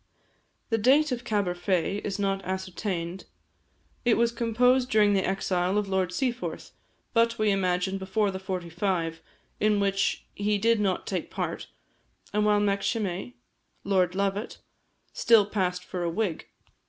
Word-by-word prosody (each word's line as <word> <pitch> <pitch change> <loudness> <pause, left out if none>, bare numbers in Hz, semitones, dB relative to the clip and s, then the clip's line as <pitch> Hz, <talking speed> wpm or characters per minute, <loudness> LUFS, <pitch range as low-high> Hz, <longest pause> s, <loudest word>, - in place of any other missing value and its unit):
The 225 - +2
date 280 +7 +4
of 245 -1 -2
"Caberfae" 195 -2 0
is 200 -1 -3
not 195 -1 0
exactly 190 -1 -3
ascertained. 185 -1 -4 0.8
It 240 -2 +3
was 235 0 +3
composed 245 +2 +2
during 210 -1 +4
the 190 -1 +2
exile 185 0 0
of 210 -1 0
Lord 190 -2 0
Seaforth, 245 +5 -3 0.4
but, 230 0 +3
we 215 -1 +2
imagine, 190 0 0
before 195 +2 0
the 190 - -5
'45, 175 -2 -2 0.4
in 210 -1 +3
which 195 0 0
he 205 0 0
did 230 +2 +3
not 195 -3 0
take - - -3
part, - - -4 0.7
and 210 0 +2
while 210 0 +4
Macshimei 200 - -1 0.5
(Lord 185 -2 +1
Lovat) 200 +2 -1 0.6
still 225 -3 +5
passed 185 -3 -1
for 180 - -5
a 170 - 0
Whig. 180 -2 -2
200 Hz, 140 wpm, -27 LUFS, 185-215 Hz, 0.8 s, still